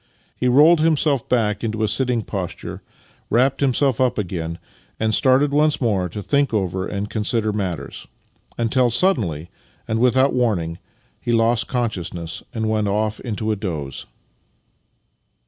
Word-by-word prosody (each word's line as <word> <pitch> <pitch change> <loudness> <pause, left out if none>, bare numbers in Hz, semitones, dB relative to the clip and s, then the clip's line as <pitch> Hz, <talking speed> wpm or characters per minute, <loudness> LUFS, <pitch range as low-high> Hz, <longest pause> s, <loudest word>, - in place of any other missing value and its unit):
He 125 - -1
rolled 150 +7 +6
himself 155 -4 +1
back 105 -4 +1
into 110 -1 -1
a - - +2
sitting 125 -1 +1
posture, 95 -4 -5 0.5
v/rapped 135 +4 +2
himself 135 -2 +2
up 125 -1 +2
again, 85 -5 -3 0.4
and 110 0 +1
started 135 +5 +4
once 150 +1 +2
more 100 -7 0
to 105 +5 -6
think 140 -2 +1
over 95 -2 -1
and 100 0 -3
consider 110 0 -1
matters; 95 -5 -4 0.5
until 120 +2 +2
suddenly, 100 - +1 0.4
and 110 0 -1
without 130 +3 +3
warning, 95 -10 0 0.4
he 120 - -2
lost 115 +1 +2
con 125 -2 0
sciousness 85 -3 -5
and 110 -3 -2
went 110 -1 0
off 105 +1 -1
into 110 -2 -3
a - - +1
doze. 80 -9 -5
110 Hz, 145 wpm, -21 LUFS, 100-130 Hz, 0.5 s, rolled